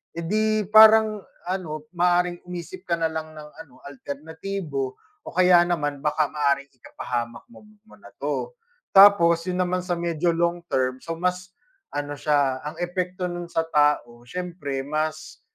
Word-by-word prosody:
eh, 170 Hz, -, -4 dB
'di 215 Hz, +3 st, 0 dB
parang, 220 Hz, -1 st, +7 dB, 0.2 s
ano, 170 Hz, -5 st, -4 dB
maaaring 175 Hz, 0 st, +1 dB
umisip 180 Hz, +1 st, -8 dB
ka 175 Hz, -, 0 dB
na 165 Hz, -1 st, +1 dB
lang 160 Hz, 0 st, -5 dB
ng 150 Hz, -1 st, -11 dB
ano, 130 Hz, -8 st, -22 dB
alternatibo 145 Hz, 0 st, -5 dB, 0.3 s
o -, -, -8 dB
kaya 180 Hz, -1 st, +6 dB
naman 145 Hz, -5 st, -2 dB
baka 150 Hz, -1 st, +1 dB
maaaring 140 Hz, -2 st, 0 dB
ikapahamak 120 Hz, -2 st, -6 dB
mo 235 Hz, -, -16 dB, 0.2 s
mo -, -, -16 dB
na -, -, -16 dB
'to. -, -, -3 dB, 0.4 s
Tapos 195 Hz, -4 st, +7 dB
'yon 180 Hz, -, -2 dB
naman 180 Hz, +1 st, -1 dB
sa 175 Hz, -1 st, -2 dB
medyo 170 Hz, 0 st, -1 dB
long-term, 165 Hz, -7 st, -1 dB
so 165 Hz, -1 st, -5 dB
mas 180 Hz, +1 st, -2 dB, 0.4 s
ano 145 Hz, 0 st, -3 dB
siya, 140 Hz, -3 st, +1 dB
ang 150 Hz, +2 st, -6 dB
epekto 180 Hz, +1 st, -3 dB
no'n 175 Hz, 0 st, -5 dB
sa 165 Hz, -1 st, -1 dB
tao 145 Hz, -6 st, +1 dB
siyempre 170 Hz, -5 st, -4 dB
mas 155 Hz, +1 st, -4 dB
170 Hz, 150 wpm, -24 LUFS, 145-180 Hz, 0.4 s, parang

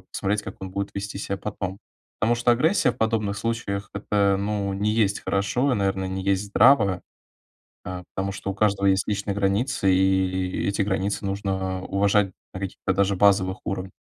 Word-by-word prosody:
посмотреть, 100 Hz, +2 st, -1 dB
как 95 Hz, -, -8 dB
он 95 Hz, -, -5 dB
будет 100 Hz, +1 st, -3 dB
вести 100 Hz, 0 st, -5 dB
ся 100 Hz, -1 st, -3 dB
потом. 95 Hz, -2 st, -5 dB, 0.4 s
Потому 115 Hz, +3 st, +2 dB
что 120 Hz, +1 st, +2 dB
агрессия 155 Hz, +5 st, +3 dB
в -, -, -9 dB
подобных 110 Hz, -2 st, 0 dB
случаях- 100 Hz, -2 st, -3 dB
это, 100 Hz, -1 st, +1 dB
ну, 100 Hz, -1 st, -1 dB
не 105 Hz, +2 st, 0 dB
есть 105 Hz, -3 st, +1 dB
хорошо. 110 Hz, +8 st, 0 dB
И, -, -, +3 dB
наверное, 95 Hz, -1 st, 0 dB
не 95 Hz, 0 st, -3 dB
есть 100 Hz, 0 st, +1 dB
здраво, 100 Hz, -4 st, +4 dB, 0.8 s
э, 90 Hz, 0 st, -5 dB
потому 95 Hz, 0 st, -2 dB
что 100 Hz, -, -4 dB
у -, -, -5 dB
каждого 100 Hz, -1 st, +1 dB
есть 95 Hz, -1 st, +2 dB
личные 100 Hz, -1 st, -1 dB
границы, 100 Hz, +1 st, +1 dB
и 95 Hz, 0 st, +3 dB, 0.4 s
и -, -, 0 dB
эти 100 Hz, +1 st, 0 dB
границы 100 Hz, 0 st, -1 dB
нужно 95 Hz, -1 st, -2 dB
уважать 100 Hz, -1 st, +2 dB, 0.2 s
на 95 Hz, -, -6 dB
каких-то 95 Hz, 0 st, -2 dB
даже 100 Hz, +1 st, +2 dB
базовых 95 Hz, 0 st, +3 dB
уров 95 Hz, -1 st, -3 dB
100 Hz, 180 wpm, -24 LUFS, 95-105 Hz, 0.8 s, здраво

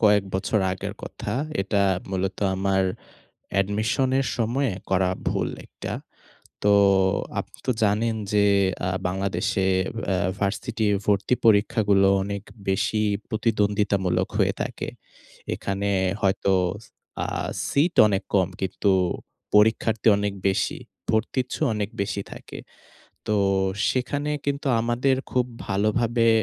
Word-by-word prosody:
কয়েক 105 Hz, -2 st, +4 dB
বছর 100 Hz, +3 st, +1 dB
আগের 95 Hz, -, -5 dB
কথা। -, -, -5 dB, 0.3 s
এটা 100 Hz, 0 st, +1 dB, 0.3 s
মূলত 95 Hz, 0 st, -2 dB, 0.2 s
আমার, 95 Hz, 0 st, +1 dB, 0.8 s
এডমিশনের 110 Hz, +7 st, +1 dB
সময়ে 120 Hz, +1 st, 0 dB, 0.2 s
করা 95 Hz, -1 st, +2 dB, 0.2 s
ভুল -, -, -1 dB, 0.2 s
একটা। -, -, -7 dB, 0.7 s
তো 105 Hz, -, +5 dB, 0.7 s
আপনিতো -, -, -6 dB
জানেন 110 Hz, +2 st, +1 dB, 0.2 s
যে 105 Hz, -1 st, +4 dB, 0.4 s
আ -, -, +1 dB, 0.2 s
বাংলাদেশে 95 Hz, 0 st, -1 dB, 0.4 s
অ্যা 95 Hz, -, +1 dB, 0.2 s
ভার্সিটি 105 Hz, +2 st, -1 dB, 0.2 s
ভর্তি 100 Hz, +4 st, +2 dB
পরীক্ষাগুলো 100 Hz, -2 st, +4 dB, 0.2 s
অনেক 100 Hz, 0 st, -4 dB, 0.3 s
বেশি 105 Hz, +3 st, +1 dB, 0.3 s
প্রতিদ্বন্দ্বিতামূলক 105 Hz, -4 st, +1 dB
হয়ে -, -, +3 dB
থাকে। -, -, -5 dB, 0.7 s
এখানে 100 Hz, +1 st, -2 dB, 0.3 s
হয়তো, 95 Hz, 0 st, +2 dB, 0.7 s
আ -, -, -2 dB, 0.4 s
সিট 160 Hz, +5 st, +2 dB
অনেক 100 Hz, -1 st, +1 dB
কম 95 Hz, -3 st, +4 dB
কিন্তু, 95 Hz, +1 st, +1 dB, 0.6 s
পরীক্ষার্থী 110 Hz, +1 st, +3 dB
অনেক 100 Hz, 0 st, -1 dB, 0.2 s
বেশি, 95 Hz, -, 0 dB, 0.3 s
ভর্তিচ্ছু 125 Hz, +3 st, -1 dB
অনেক 105 Hz, -1 st, -2 dB
বেশি 100 Hz, 0 st, -1 dB
থাকে। -, -, -9 dB, 0.7 s
তো 105 Hz, -, +2 dB, 0.5 s
সেখানে 145 Hz, +3 st, -1 dB, 0.2 s
কিন্তু 140 Hz, 0 st, -1 dB
আমাদের 125 Hz, +3 st, +1 dB, 0.2 s
খুব 125 Hz, -1 st, +2 dB, 0.2 s
ভালোভাবে 115 Hz, +4 st, +2 dB
105 Hz, 105 wpm, -24 LUFS, 95-115 Hz, 0.8 s, তো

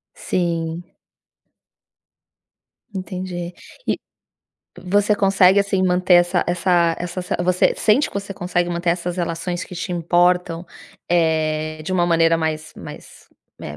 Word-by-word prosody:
Sim. 170 Hz, -1 st, -2 dB, 2.1 s
Entendi. 180 Hz, -2 st, -5 dB, 0.3 s
E -, -, 0 dB, 0.9 s
você 205 Hz, +3 st, +2 dB
consegue, 195 Hz, -1 st, +4 dB
assim, 195 Hz, -1 st, 0 dB
manter 180 Hz, 0 st, +3 dB
essa 175 Hz, +1 st, +3 dB
essa 175 Hz, -1 st, +2 dB
essa 175 Hz, +1 st, -4 dB, 0.2 s
você 180 Hz, 0 st, +2 dB
sente 230 Hz, +7 st, +3 dB
que -, -, -17 dB
você 195 Hz, 0 st, -7 dB
consegue 175 Hz, -1 st, -1 dB
manter 170 Hz, 0 st, 0 dB
essas 175 Hz, +1 st, -2 dB
relações 175 Hz, +1 st, -3 dB
que 180 Hz, -, -11 dB
te 180 Hz, +1 st, -4 dB
importam, 175 Hz, 0 st, +1 dB, 0.4 s
eh, 155 Hz, -2 st, 0 dB
de 185 Hz, -, -3 dB
uma 175 Hz, -1 st, +2 dB
maneira 165 Hz, -1 st, +3 dB
mais 155 Hz, -1 st, -3 dB
mais, -, -, -11 dB, 0.3 s
eh, 75 Hz, -, -7 dB
175 Hz, 120 wpm, -21 LUFS, 165-185 Hz, 2.1 s, consegue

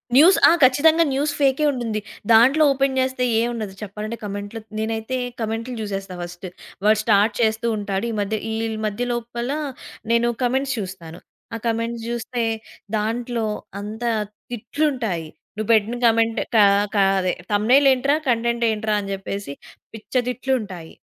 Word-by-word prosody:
News. 335 Hz, +8 st, +7 dB
ఆ! -, -, +6 dB
ఖచ్చితంగా 315 Hz, +6 st, +5 dB
news 290 Hz, +2 st, 0 dB
ఫేకే 275 Hz, +1 st, +3 dB
ఉంటుంది. 235 Hz, -5 st, -2 dB, 0.3 s
దాంట్లో 255 Hz, +8 st, +6 dB
ఓపెన్ 270 Hz, 0 st, +1 dB
జేస్తే 260 Hz, -1 st, 0 dB
ఏం 235 Hz, -, +1 dB
ఉండదు. 215 Hz, -4 st, -5 dB
చెప్పాలంటే 215 Hz, +2 st, -5 dB
కమెంట్‌లో 205 Hz, +2 st, -5 dB, 0.2 s
నేనైతే 225 Hz, +3 st, -2 dB, 0.2 s
కమెంట్‌లు 225 Hz, +3 st, -3 dB
జూసేస్తా 195 Hz, -3 st, -5 dB
ఫస్ట్. 175 Hz, +1 st, -8 dB, 0.4 s
వాడు 215 Hz, 0 st, +5 dB
స్టార్ట్ 210 Hz, 0 st, +3 dB
చేస్తూ 220 Hz, +1 st, +1 dB
ఉంటాడు, 200 Hz, 0 st, -2 dB
ఈ -, -, -4 dB
మధ్య 210 Hz, +2 st, -1 dB
ఈ -, -, -2 dB, 0.3 s
మధ్య 215 Hz, +4 st, -2 dB
లోపల 240 Hz, +1 st, -4 dB, 0.6 s
నేను 235 Hz, +1 st, +3 dB
కమెంట్స్ 265 Hz, +2 st, 0 dB
చూస్తాను. 180 Hz, -4 st, -7 dB, 0.4 s
ఆ -, -, -2 dB
కమెంట్స్ 230 Hz, 0 st, -2 dB
జూస్తే 240 Hz, 0 st, -3 dB, 0.5 s
దాంట్లో 230 Hz, +2 st, -2 dB, 0.3 s
అంతా 220 Hz, +3 st, -3 dB, 0.4 s
తిట్లుంటాయి. 240 Hz, -, -2 dB, 0.3 s
"నువ్వు 215 Hz, 0 st, -4 dB
పెట్టిన 220 Hz, +2 st, +2 dB
కమెంట్ 225 Hz, 0 st, +2 dB, 0.2 s
కా 210 Hz, -2 st, +7 dB, 0.3 s
కా 200 Hz, -, +5 dB, 0.2 s
అదే 185 Hz, -1 st, 0 dB, 0.2 s
థంబ్‌నెయిల్ 245 Hz, +7 st, +4 dB
ఏంట్రా, 275 Hz, +3 st, +1 dB
కంటెంట్ 235 Hz, 0 st, +1 dB
ఏంట్రా" 215 Hz, 0 st, -1 dB
అని 195 Hz, 0 st, -6 dB
జెప్పేసి 195 Hz, -4 st, -5 dB, 0.4 s
పిచ్చ 220 Hz, -1 st, -12 dB, 0.2 s
తిట్లుంటాయి. 220 Hz, -10 st, -3 dB
225 Hz, 140 wpm, -22 LUFS, 210-250 Hz, 0.6 s, News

